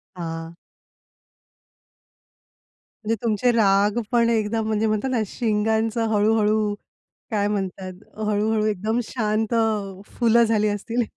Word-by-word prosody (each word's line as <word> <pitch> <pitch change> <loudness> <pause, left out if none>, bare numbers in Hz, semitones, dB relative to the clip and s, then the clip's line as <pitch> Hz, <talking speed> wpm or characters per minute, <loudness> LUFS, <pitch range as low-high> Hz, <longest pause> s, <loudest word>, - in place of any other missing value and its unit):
हां. 165 -1 -6 2.5
म्हणजे 225 +2 +1
तुमचे 230 +1 +1
राग 205 -1 +3
पण 235 -1 +3
एकदम, 220 0 0
म्हणजे 220 0 0
म्हणतात 215 +4 -1
ना, 240 -3 +1
शिंगांचा 220 +1 0
हळू-हळू, 215 0 +2 0.6
काय 205 -2 0
म्हणतात? 190 -2 -4 0.2
हळू-हळू 215 +1 +1
एकदम 215 +3 -1
शांत 220 -1 -1 0.5
फुलं 235 0 +3
झाली 215 -2 +1
असतील 230 +4 -1
215 Hz, 100 wpm, -23 LUFS, 205-225 Hz, 2.5 s, राग